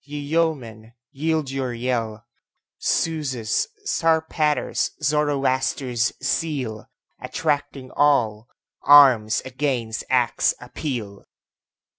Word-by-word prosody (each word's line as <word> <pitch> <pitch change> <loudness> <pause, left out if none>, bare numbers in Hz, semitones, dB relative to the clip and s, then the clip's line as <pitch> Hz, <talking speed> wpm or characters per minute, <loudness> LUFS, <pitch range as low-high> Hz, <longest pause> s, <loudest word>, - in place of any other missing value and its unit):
ye 145 +1 -8
yeomen, 140 -8 -2 0.2
yield 155 -1 -1
your 135 -2 -2
yell! 115 -3 -3 0.6
Zeus', 135 -9 -1 0.2
Zarpater's, 160 -2 +1
Zoroaster's 135 -5 0
zeal, 135 -7 -2 0.3
Attracting 145 -4 -3
all, 120 -7 +2 0.3
arms 130 -7 +6
against 130 -4 -2
acts 125 -2 +2
appeal! 115 -9 -6
135 Hz, 75 wpm, -23 LUFS, 115-150 Hz, 0.6 s, arms